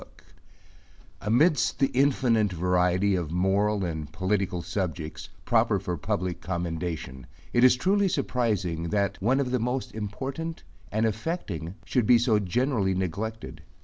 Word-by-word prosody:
1 -, -, -9 dB
Amidst 125 Hz, +2 st, +3 dB
the 135 Hz, -, +2 dB
infinite 125 Hz, -6 st, +3 dB
variety 90 Hz, +2 st, +2 dB
of 85 Hz, -5 st, -1 dB
moral 100 Hz, +3 st, +1 dB
and 80 Hz, -3 st, -4 dB
political 95 Hz, -1 st, -1 dB
subjects, 85 Hz, -4 st, -4 dB, 0.2 s
proper -, -, +3 dB
for 90 Hz, -, -3 dB
public 90 Hz, +3 st, -2 dB
commendation, 85 Hz, -7 st, -4 dB, 0.3 s
it 120 Hz, -, +4 dB
is 130 Hz, 0 st, +7 dB
truly 195 Hz, +9 st, +2 dB
surprising, 105 Hz, -, -1 dB
that 100 Hz, -1 st, 0 dB
one 125 Hz, +7 st, +2 dB
of 130 Hz, -3 st, -1 dB
the 125 Hz, -, +1 dB
most 125 Hz, +3 st, -2 dB
important 135 Hz, +10 st, -5 dB, 0.3 s
and 110 Hz, +2 st, +1 dB
affecting 105 Hz, -, -3 dB
should 120 Hz, -1 st, +1 dB
be 125 Hz, -, +7 dB
so 115 Hz, -3 st, +3 dB
generally 105 Hz, 0 st, 0 dB
neglected. 100 Hz, +5 st, -4 dB
100 Hz, 135 wpm, -27 LUFS, 90-125 Hz, 0.3 s, is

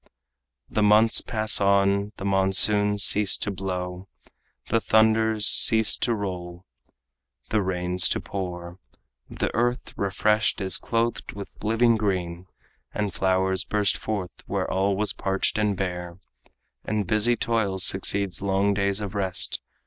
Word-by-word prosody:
The 110 Hz, -, -2 dB
months 105 Hz, +2 st, +4 dB
pass 110 Hz, -3 st, +2 dB
on; 100 Hz, +1 st, +1 dB
the 95 Hz, -, -7 dB
monsoons 100 Hz, +1 st, +3 dB
cease 105 Hz, 0 st, +3 dB
to 105 Hz, -, -4 dB
blow, 90 Hz, -1 st, -6 dB, 0.6 s
The 115 Hz, 0 st, +1 dB
thunders 110 Hz, -1 st, +2 dB
cease 110 Hz, -1 st, +5 dB
to 120 Hz, -, -1 dB
roll, 90 Hz, -3 st, -7 dB, 0.9 s
the 110 Hz, -, +1 dB
rains 90 Hz, -1 st, -1 dB
to -, -, -1 dB
pour; 90 Hz, -2 st, -7 dB, 0.5 s
The -, -, -4 dB
earth, 120 Hz, +2 st, -2 dB
refreshed, 105 Hz, +3 st, 0 dB
is 95 Hz, -3 st, +1 dB
clothed 115 Hz, 0 st, -3 dB
with 100 Hz, 0 st, -11 dB
living 115 Hz, +2 st, +2 dB
green, 90 Hz, -4 st, -3 dB, 0.4 s
And 105 Hz, -2 st, -3 dB
flowers 95 Hz, 0 st, 0 dB
burst 105 Hz, 0 st, 0 dB
forth 100 Hz, -5 st, -5 dB, 0.2 s
where -, -, -3 dB
all 95 Hz, +1 st, 0 dB
was 105 Hz, +1 st, -2 dB
parched 95 Hz, +2 st, -1 dB
and 105 Hz, -2 st, -1 dB
bare, 90 Hz, -2 st, -5 dB, 0.7 s
And 105 Hz, -1 st, -2 dB
busy 110 Hz, +5 st, +3 dB
toil 110 Hz, -5 st, -2 dB
succeeds 95 Hz, 0 st, +1 dB
long 100 Hz, +1 st, 0 dB
days 100 Hz, +1 st, -1 dB
of 100 Hz, -3 st, -6 dB
rest. 95 Hz, -3 st, 0 dB
100 Hz, 135 wpm, -24 LUFS, 95-105 Hz, 0.9 s, cease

